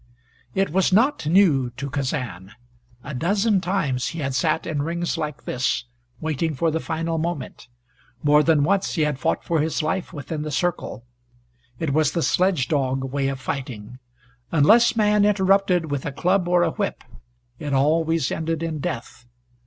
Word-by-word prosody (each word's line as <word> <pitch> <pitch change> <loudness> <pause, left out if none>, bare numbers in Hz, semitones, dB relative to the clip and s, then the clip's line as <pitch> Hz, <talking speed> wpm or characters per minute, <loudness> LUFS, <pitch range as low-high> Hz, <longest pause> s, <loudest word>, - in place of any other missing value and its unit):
It 195 -4 +1
was 190 +3 +2
not 225 - +2
new 155 -8 +4
to 140 +1 -4
Kazan. 130 - -4 0.5
A 145 - -7
dozen 195 - +1
times 150 -9 -1
he 165 - -5
had 135 -2 -2
sat 155 +5 0
in 155 -3 -2
rings 170 +3 -2
like 150 -6 -4
this, 125 0 -1 0.4
waiting 155 0 -2
for 165 +4 +1
the 160 - -1
final 165 0 -2
moment. 165 -6 -4 0.6
More 150 0 +5
than 155 -2 +3
once 195 +5 +1
he 160 - +2
had 150 -3 -1
fought 85 -8 0
for 165 -2 0
his 155 +1 0
life 175 +4 -2
within 150 -1 -5
the 155 - -4
circle. 150 -5 -2 0.7
It 150 -1 -2
was 155 -1 +2
the 170 - 0
sledge 180 -8 +2
dog 135 -2 -1
way 140 -1 0
of 135 -1 -3
fighting. 125 -3 -6 0.5
Unless 215 +11 +5
man 210 -2 +3
interrupted 190 -5 +2
with 140 -2 -2
a 145 - -3
club 180 +6 +1
or 175 0 +3
a 165 - +1
whip 200 +1 -3 0.6
it 145 - -4
always 155 +2 +2
ended 165 0 -2
in 160 -2 -3
death. 120 -2 -5
155 Hz, 170 wpm, -23 LUFS, 140-175 Hz, 0.7 s, More